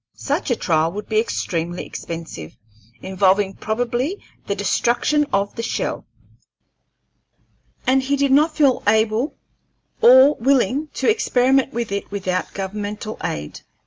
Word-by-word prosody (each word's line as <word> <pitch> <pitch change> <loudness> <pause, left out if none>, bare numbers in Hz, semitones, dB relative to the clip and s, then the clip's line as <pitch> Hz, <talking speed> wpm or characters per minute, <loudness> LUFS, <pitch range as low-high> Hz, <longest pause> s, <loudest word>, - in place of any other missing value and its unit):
Such - - -2
a 245 - +2
trial 160 -5 +1
would 210 +1 -6
be 215 -1 +2
extremely 175 -6 -3
expensive, 165 - -8 0.5
involving 190 +1 +2
probably 245 - -2 0.3
the - - -1
destruction 290 +5 +1
of 200 +1 0
the - - -5
shell, 230 - -3 1.8
and 265 +1 +3
he 275 +2 0
did 280 -1 +1
not 305 +3 +3
feel 280 -5 +3
able 220 +6 +2 0.7
or 260 +4 +7
willing 265 +3 +1
to - - -1
experiment 270 - +2
with 235 -3 -4
it 200 0 -3
without 185 -2 -3
governmental 205 +2 -5
aid. 75 0 -4
225 Hz, 125 wpm, -21 LUFS, 195-265 Hz, 1.8 s, or